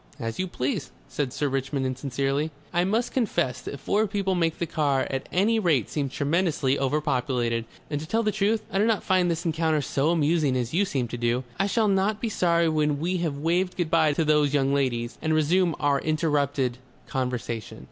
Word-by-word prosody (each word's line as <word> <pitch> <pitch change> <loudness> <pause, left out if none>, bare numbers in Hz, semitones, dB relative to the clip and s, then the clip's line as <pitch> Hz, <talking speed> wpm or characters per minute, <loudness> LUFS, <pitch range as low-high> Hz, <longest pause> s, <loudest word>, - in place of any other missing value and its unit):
"As 115 -2 -4
you 185 - 0
please," 135 -4 -2 0.2
said 140 -4 -2
Sir 145 - -1
Richmond 135 0 -1
insincerely. 135 +3 -1 0.2
"I 175 - +3
must 225 +5 0
confess 170 - 0
that 140 - -7
four 210 +9 +1
people 195 -1 -1
make 165 -3 0
the 170 - -1
car 145 -4 +1
at 135 0 -4
any 215 +5 +2
rate 155 - +1
seem 140 -3 -1
tremendously 145 -1 0
overpopulated. 125 -4 0 0.2
And 145 -1 -3
to 155 - -7
tell 225 +6 +1
the 215 - +1
truth, 210 +1 +1
I 195 - 0
do 210 - +4
not 225 -3 +1
find 185 -2 +2
this 170 +1 -2
encounter 160 -1 +1
so 140 +1 0
amusing 155 -4 +2
as 125 +1 -3
you 195 +5 +3
seem 135 -10 -1
to 120 - -5
do.... 120 +2 0 0.2
I 195 - +2
shall 220 +1 +2
not 200 +2 +1
be 230 - -2
sorry 170 -4 +2
when 150 -2 +1
we 180 +4 0
have 165 -5 -2
waved 175 +5 0
good 170 -3 -1
bye 160 -3 +4
to 160 +2 0
those 150 -1 +3
young 135 -1 +2
ladies, 125 -4 -1
and 155 0 +1
resume 165 +2 +2
our 145 -1 +2
interrupted 145 -5 0 0.3
conversation." 125 -4 -3
150 Hz, 200 wpm, -26 LUFS, 135-180 Hz, 0.3 s, do